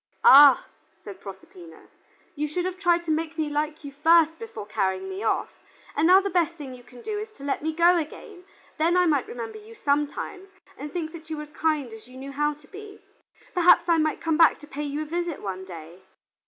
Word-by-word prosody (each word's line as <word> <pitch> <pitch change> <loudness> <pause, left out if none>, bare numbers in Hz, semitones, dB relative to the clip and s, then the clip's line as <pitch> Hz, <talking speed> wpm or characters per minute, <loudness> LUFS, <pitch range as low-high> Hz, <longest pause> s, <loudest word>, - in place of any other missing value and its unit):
"Ah," 280 -1 +8 0.4
said 200 -1 -10
Proserpina, 330 - -12 0.5
"you 300 +1 -2
should 350 +4 -3
have 370 0 -4
tried 345 -3 +2
to 330 - -2
make 320 +1 -2
me 305 -2 -1
like 300 +1 -2
you 285 - -7
first 325 +2 +3
before 455 - -8
carrying 190 -2 -2
me 190 +1 -6
off, 225 - -1 0.4
and 300 +3 +3
now 370 +2 +8
the 395 0 -3
best 340 -2 +1
thing 285 -5 -8
you 250 - -12
can 245 0 -16
do 420 -1 -3
is 430 +1 -6
to 275 - -14
let 280 - -2
me 315 +2 -1
go 345 +2 +4
again; 355 +4 -8 0.4
then 335 +3 +3
I 360 - +4
might 295 -5 +1
remember 455 -1 -7
you 440 +2 -14
sometimes 295 +4 -2 0.3
and 290 +2 -8
think 330 -3 -4
that 325 -1 -12
you 315 - -4
were 300 - -5
as 300 - -13
kind 300 -7 -1
as 225 +1 -12
you 255 +1 -14
knew 270 +1 -8
how 295 +1 0
to 295 0 -21
be. 410 +1 -11 0.5
Perhaps 355 -1 +5
I 335 -1 +3
might 310 0 0
come 325 -2 0
back 330 -1 +6
to 295 - -12
pay 295 0 -6
you 290 +1 -3
a - - -8
visit 340 0 -3
one 190 -1 -6
day." 170 0 -11
310 Hz, 225 wpm, -25 LUFS, 280-350 Hz, 0.5 s, Ah